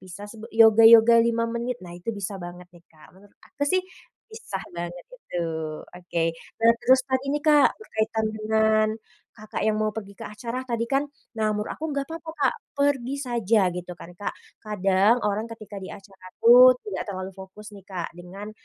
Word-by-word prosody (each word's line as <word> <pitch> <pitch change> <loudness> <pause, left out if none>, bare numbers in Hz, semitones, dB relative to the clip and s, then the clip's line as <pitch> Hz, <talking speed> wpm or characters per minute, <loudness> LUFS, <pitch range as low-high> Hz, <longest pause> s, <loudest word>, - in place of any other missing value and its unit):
bisa 185 +2 -10 0.3
yoga 225 0 +7
yoga 230 0 +8
5 230 0 +1
menit, 235 +1 -3
nah 175 - -10
itu 175 +4 -11
bisa 200 -3 -4
banget 175 +1 -9
nih 175 - -17
Kak. 155 0 -19
Menurut 200 +2 -21
aku 285 - -8
sih, 370 0 +2 0.5
pisah 195 - -6
banget 175 +1 -6
itu. - - -10 0.6
Oke, 170 -2 -2 0.3
nah 230 +1 +6
terus 260 +1 +5
saat 260 -1 0
ini 290 - +1
Kak, 295 -2 +6
berkaitan 220 - -2
dengan 215 0 +2 0.5
Kakak 215 0 -5
yang 215 0 +1
mau 215 -1 -1
pergi 200 -2 -8
ke - - -7
acara 240 +4 -6
tadi 235 -2 -2
kan, 275 +2 +1 0.3
nah 215 -1 +1
menurut 210 +1 -3
aku 315 - -5
nggak 280 +2 -3
apa-apa 325 0 -7
Kak 265 - +3 0.2
pergi 280 -3 0
saja, 225 -6 +1
gitu 180 0 -6
kan 170 0 -12
Kak. 205 - -4 0.2
Kadang 205 +2 +2
orang 210 +2 -1
ketika 215 -3 -9
di 190 - -8
acara 195 -2 -16 0.2
tuh, 250 +2 +9
tidak 415 - -5
terlalu 185 -1 -5
fokus 190 +3 -12
nih 200 -2 -14
Kak 180 -4 -5
dengan, 195 +4 -9
215 Hz, 180 wpm, -25 LUFS, 190-235 Hz, 0.6 s, tuh